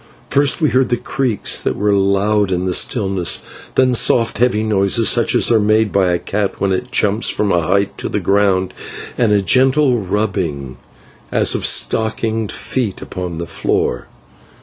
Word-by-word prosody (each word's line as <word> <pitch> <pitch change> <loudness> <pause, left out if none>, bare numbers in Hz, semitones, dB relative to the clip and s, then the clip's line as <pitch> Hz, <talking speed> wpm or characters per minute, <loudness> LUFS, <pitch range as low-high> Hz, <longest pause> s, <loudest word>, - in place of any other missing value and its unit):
First 140 0 +2
we 155 - +2
heard 125 -2 0
creaks 125 -7 0
that - - -2
were 105 0 0
loud 100 +1 +1
in 90 0 -1
the 90 - -1
stillness, 95 -4 +1 0.3
then 130 -1 +3
soft 115 -2 +2
heavy 120 -3 +1
noises 105 +1 +2
such 120 -2 +2
as - - +3
are 115 - +4
made 110 0 +1
by 95 -2 +1
a 85 - +1
cat 100 +3 -3
when 100 - 0
it 95 - -3
jumps 105 +2 +2
from 105 -2 0
a 85 - +2
height 100 +4 -1
to - - -3
the - - -2
ground, 100 -2 +1 0.4
and 115 -4 +1
a 105 -1 +3
gentle 130 +2 +2
rubbing 90 - -3 0.5
as - - +2
of - - +1
stockinged 110 -1 0
feet 115 -7 -3
upon 90 -2 -6
the 85 - -5
floor. - - -2
105 Hz, 170 wpm, -16 LUFS, 95-115 Hz, 0.5 s, are